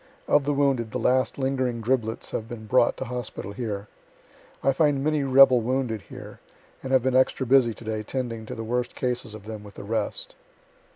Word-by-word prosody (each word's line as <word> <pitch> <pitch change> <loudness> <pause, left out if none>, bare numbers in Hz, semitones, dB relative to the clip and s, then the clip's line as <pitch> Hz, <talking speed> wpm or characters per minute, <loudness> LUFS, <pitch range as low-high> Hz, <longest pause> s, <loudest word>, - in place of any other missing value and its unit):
Of 145 -1 +3
the 145 - +1
wounded 135 -5 +1
the - - -3
last 130 0 +1
lingering 130 -3 -1
driblets 115 -1 -1
have 110 0 -4
been 115 -3 -7
brought 120 +1 +3
to - - -4
hospital 120 -5 -5
here. 105 -3 -4 0.8
I 135 - +4
find 145 -1 +2
many 155 0 +1
rebel 135 -2 +6
wounded 120 -2 -1
here, - - -10 0.4
and 130 - -5
have 130 -2 +4
been 130 0 +1
extra 130 0 +3
busy 125 -3 +4
to - - -12
day 110 -1 -3
'tending 115 -1 -4
to - - -6
the 115 - -5
worst 125 +2 -2
cases 125 -4 -2
of 105 -2 -11
them 110 -1 -7
with 100 -1 -13
the - - -8
rest. 110 0 -3
125 Hz, 195 wpm, -25 LUFS, 110-130 Hz, 0.8 s, rebel